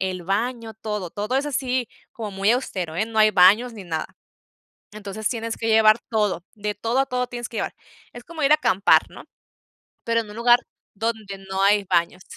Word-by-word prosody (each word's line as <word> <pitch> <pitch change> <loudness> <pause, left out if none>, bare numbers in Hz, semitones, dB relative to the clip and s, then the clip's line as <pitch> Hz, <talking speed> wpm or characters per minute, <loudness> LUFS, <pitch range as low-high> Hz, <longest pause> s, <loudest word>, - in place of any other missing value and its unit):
el 185 -2 -3
baño, 225 +4 -2
todo, 210 -4 -5
todo 210 +8 -2
es 280 +2 0
así 255 -4 -1 0.2
como 215 -3 -7
muy 195 +2 +1
austero, 185 -10 -2
eh, 215 - 0
no 225 -1 -4
hay 215 0 +6
baños 205 +6 +5
ni 205 -3 -9
nada. 160 -3 -3 0.9
Entonces 210 0 -4
tienes 230 -2 -3
que 225 - -3
llevar 220 0 +6
todo 210 -6 0
de 210 -1 -4
todo 230 +5 -1
a 270 - +3
todo 250 -1 -2
tienes 240 -1 -6
que 230 - -8
llevar. - - -2 0.4
Es 240 - -11
como 320 -2 -6
ir 275 - +3
a - - +9
acampar, 195 -9 +3
¿no?, - - -12 0.8
pero 230 0 +1
en 215 -2 -8
un - - -10
lugar 240 +1 +5 0.4
donde 215 -2 -4
no 190 0 -1
hay 200 +1 +4
baños. 175 +1 0
215 Hz, 200 wpm, -23 LUFS, 195-240 Hz, 0.9 s, a